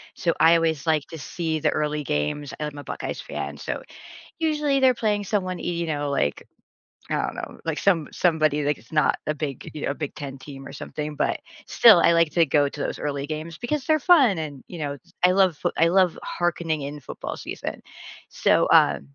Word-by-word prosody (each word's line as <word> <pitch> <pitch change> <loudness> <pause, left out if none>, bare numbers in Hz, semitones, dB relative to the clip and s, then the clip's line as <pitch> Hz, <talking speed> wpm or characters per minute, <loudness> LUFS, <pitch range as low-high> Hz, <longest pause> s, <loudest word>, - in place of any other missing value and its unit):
so, 170 -1 0
I 165 +1 +7
always 160 -3 0
like 155 -3 +2
to 160 - -8
see 160 +3 -3
the - - +2
early 150 0 -1
games, 75 - -2
I'm 150 -1 -4
a - - -8
Buckeyes - - -5
fan, - - -5
so, - - -5 0.5
usually, 300 -4 +1
they're 260 -1 +5
playing 210 -3 0
someone, 185 -2 -1
y - - -9
you 170 -1 -2
know, 145 -2 -2
like, 75 - -1 0.6
I - - 0
don't - - -2
know, - - -7
like 165 -2 -2
some 170 -6 +2
somebody, 155 -4 +2
like, 145 0 0
it's 115 - -21
not 150 -1 +2
a 155 - 0
big, 145 -4 -5
you 150 - -6
know, - - 0
a - - -5
big 150 -2 -5
10 140 -2 -7
team 135 0 -10
or - - -9
something, 150 +1 -6
but - - 0 0.3
still, 225 -5 +7
I 170 - +5
like 165 -2 +3
to 170 -1 +4
go 145 0 +2
to 145 - -10
those - - -3
early 140 -1 -3
games 155 +1 -5
because 280 - -2
they're 310 -1 +3
fun 275 - +5
and, 150 -4 -6
you 175 - -8
know, 145 -2 -2
s 140 - -16
I 180 - +5
love 185 -4 +3
foo - - -1
I 165 - +5
love 185 0 +3
hearkening 170 -3 -1
in 145 +1 -6
football 140 - -7
season. - - -6 0.5
So, - - +2
uh, 70 -1 +5
155 Hz, 215 wpm, -24 LUFS, 145-180 Hz, 0.6 s, I